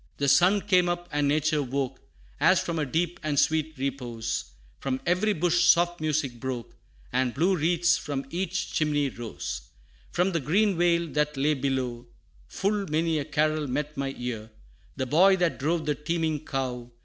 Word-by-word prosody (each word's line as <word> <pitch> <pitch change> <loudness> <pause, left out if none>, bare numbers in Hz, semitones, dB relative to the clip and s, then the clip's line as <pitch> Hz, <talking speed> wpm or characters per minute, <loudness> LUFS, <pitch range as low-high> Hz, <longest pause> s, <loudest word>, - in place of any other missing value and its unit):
The 140 - 0
sun 180 +9 +5
came 180 -3 +3
up, 175 0 -3
and 145 -1 +1
nature 155 +1 +2
woke, 135 0 -3 0.4
As - - +5
from 170 -2 -2
a 150 - -1
deep 170 +5 -1
and 155 -3 -2
sweet 160 0 +1
repose; 120 -5 -3 0.3
From 130 -1 -2
every 185 +5 +2
bush 175 -1 +2
soft 175 -1 +4
music 150 -6 -1
broke, 125 -2 -5 0.4
And 130 -1 +1
blue 180 +6 +3
wreaths 170 +1 +2
from 140 -2 -4
each 180 +1 -2
chimney 145 -2 +1
rose. 115 - -6 0.5
From 180 +2 +1
the 170 - 0
green 190 +8 +2
vale 170 0 +2
that 150 -1 0
lay 145 +3 +2
below. 130 -3 -2 0.4
Full 200 0 -1
many 160 +1 +1
a 145 - -3
carol 155 0 0
met 150 +3 -3
my 135 0 -3
ear; 115 -3 -5 0.5
The 130 - -2
boy 180 +9 +5
that 175 -3 0
drove 160 +3 0
the 150 - +1
teeming 155 0 -2
cow. 125 -3 -3
150 Hz, 170 wpm, -27 LUFS, 135-170 Hz, 0.5 s, sun